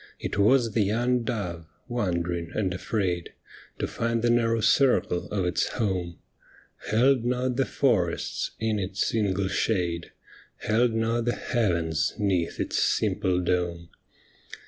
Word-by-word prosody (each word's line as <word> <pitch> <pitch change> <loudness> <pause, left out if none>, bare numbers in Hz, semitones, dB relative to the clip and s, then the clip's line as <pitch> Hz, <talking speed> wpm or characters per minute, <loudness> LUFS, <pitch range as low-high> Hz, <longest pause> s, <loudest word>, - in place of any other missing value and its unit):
It - - -4
was 115 +2 +4
the 110 - +1
young 120 +5 +1
dove, 90 -8 -4 0.2
wond'ring 85 -7 -2
and 95 -4 0
afraid 90 -3 -2 0.4
To - - -1
find 115 0 -2
the 120 - +3
narrow 115 -1 +2
circle 120 -7 +2
of 95 -3 -1
its 90 - +1
home 90 -7 -2 0.7
Held 125 +3 +3
not 125 +1 0
the 135 +1 +1
forests 90 -11 0
in 110 -1 0
its 95 +1 -1
ingle 100 -3 +1
shade. 90 -4 -1 0.5
Held 115 +2 +2
not 115 +1 0
the 120 - 0
Heavens 85 - 0
'neath 95 -5 0
its - - 0
simple 90 -1 +1
dome. 85 -1 -1
105 Hz, 130 wpm, -26 LUFS, 90-115 Hz, 0.7 s, was